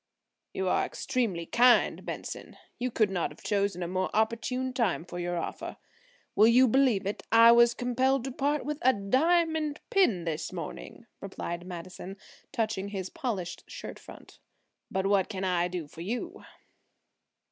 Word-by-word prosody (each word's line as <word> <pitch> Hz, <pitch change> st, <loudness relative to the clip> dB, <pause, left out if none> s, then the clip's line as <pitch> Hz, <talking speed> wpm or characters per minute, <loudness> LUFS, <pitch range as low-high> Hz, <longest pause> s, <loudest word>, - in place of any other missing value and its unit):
"You 190 Hz, -, -2 dB
are -, -, +2 dB
extremely 230 Hz, -11 st, -2 dB
kind, 245 Hz, +6 st, +4 dB
Benson; -, -, -7 dB, 0.2 s
you 250 Hz, +1 st, -1 dB
could 215 Hz, -4 st, +1 dB
not 180 Hz, -3 st, -1 dB
have -, -, -15 dB
chosen 200 Hz, -3 st, 0 dB
a -, -, -3 dB
more 185 Hz, +1 st, -1 dB
opportune 235 Hz, +4 st, 0 dB
time 215 Hz, -9 st, 0 dB
for 175 Hz, 0 st, -7 dB
your 175 Hz, 0 st, -2 dB
offer. 170 Hz, -, -5 dB, 0.6 s
Will 215 Hz, +2 st, +6 dB
you 250 Hz, +3 st, +6 dB
believe 245 Hz, -5 st, +3 dB
it–I 230 Hz, +3 st, +5 dB
was 235 Hz, 0 st, +6 dB
compelled 255 Hz, +1 st, +1 dB
to 265 Hz, -, -4 dB
part 285 Hz, +3 st, -1 dB
with 300 Hz, +1 st, -3 dB
a 260 Hz, -, +5 dB
diamond 305 Hz, -, +1 dB
pin 235 Hz, -, +3 dB
this 160 Hz, -2 st, -3 dB
morning," -, -, -7 dB
replied 175 Hz, +1 st, -6 dB
Madison, 185 Hz, +2 st, -8 dB, 0.3 s
touching 220 Hz, -6 st, -1 dB
his 195 Hz, -2 st, -5 dB
polished 225 Hz, -, -4 dB
shirt -, -, -8 dB
front. -, -, -14 dB, 0.5 s
"But 190 Hz, 0 st, -1 dB
what 195 Hz, -1 st, +2 dB
can 190 Hz, -1 st, -4 dB
I 180 Hz, -2 st, +1 dB
do 175 Hz, -4 st, -5 dB
for 160 Hz, +2 st, -11 dB
you?" 225 Hz, +8 st, -4 dB
215 Hz, 155 wpm, -29 LUFS, 185-255 Hz, 0.6 s, Will